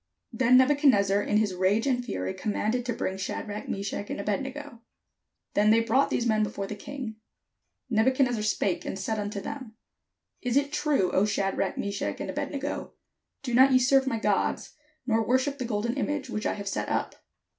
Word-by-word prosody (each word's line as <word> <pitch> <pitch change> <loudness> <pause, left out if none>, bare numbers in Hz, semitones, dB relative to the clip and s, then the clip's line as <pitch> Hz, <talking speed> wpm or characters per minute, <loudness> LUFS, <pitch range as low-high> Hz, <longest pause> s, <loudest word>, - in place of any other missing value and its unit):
Then 255 -1 +5
Nebuchadnezzar 255 -8 +4
in 210 - +1
his 210 -3 +1
rage 190 +5 +2
and 250 -3 +1
fury 95 - -3
com 210 - -3
manded 235 +5 0
to 245 - -1
bring 190 -4 -3
Shadrach, 205 +2 -5
Meshach, 200 +1 -4
and - - -4
Abed 205 +5 -1
nego. 270 -3 -8 0.7
Then 210 +1 +3
they 225 +1 +6
brought 230 +5 +2
these 240 - 0
men 215 -2 +2
before 200 -2 -2
the 195 - -5
king. 230 0 -7 0.7
Nebu 225 0 +3
chadnezzar 255 -4 +1
spake 205 -3 0
and - - -4
said 215 +3 -2
unto 205 0 -3
them: 260 -1 -7 0.7
"Is 250 +1 +1
it 285 +1 +1
true, 290 - +1
O 190 - +3
Shadrach, 195 -2 -1
Meshach, 200 0 -3
and - - -3
Abed - - -3
nego, 280 0 -4 0.5
do 250 -3 -3
not 260 +3 +6
ye - - +7
serve 265 +1 +3
my 230 - 0
gods, - - 0 0.3
nor 225 -2 +2
worship 260 +5 +1
the 255 - -2
golden 230 +1 -1
image 285 +1 -2
which 215 - -2
I - - -1
have 200 -1 -7
set 195 - -2
up? - - -2
225 Hz, 190 wpm, -27 LUFS, 205-260 Hz, 0.7 s, ye